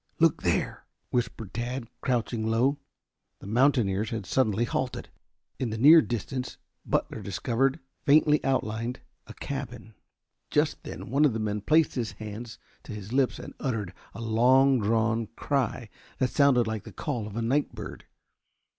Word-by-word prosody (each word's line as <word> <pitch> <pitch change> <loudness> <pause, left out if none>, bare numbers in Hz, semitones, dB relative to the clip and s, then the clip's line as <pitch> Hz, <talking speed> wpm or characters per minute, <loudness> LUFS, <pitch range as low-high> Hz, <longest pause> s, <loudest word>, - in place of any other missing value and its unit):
"Look - - +3
there!" - - -1 0.2
whispered 115 -5 -2
Tad, 120 +2 -3
crouching 115 -3 -1
low. 125 +6 +2 0.6
The - - -13
mountaineers 110 -3 +2
had 110 -4 -4
suddenly 110 +1 +1
halted. 125 +1 -3 0.5
In 125 - -1
the 110 - -3
near 155 +7 +8
distance 125 +1 -4 0.3
Butler - - -1
discovered, 135 +5 0 0.2
faintly 150 0 +4
outlined, 120 -2 -1 0.3
a - - -10
cabin. 125 -5 -6 0.6
Just - - +1
then - - -8
one 140 +3 +3
of 145 -6 +4
the 110 - -2
men 105 -1 -2
placed 155 +7 +3
his 115 -5 -3
hands 110 +3 -8 0.2
to 120 - -9
his 105 +1 -7
lips 135 -1 +2
and - - -9
uttered 105 -8 -2 0.2
a - - -7
long 125 +4 +4
drawn 115 +1 +1
cry 130 -4 -1 0.3
that 130 -1 0
sounded 140 -5 +4
like 110 -2 -3
the - - -10
call 120 -9 -3
of 105 - -9
a 115 - -1
night 135 +6 0
bird. - - -8
120 Hz, 155 wpm, -27 LUFS, 110-135 Hz, 0.6 s, near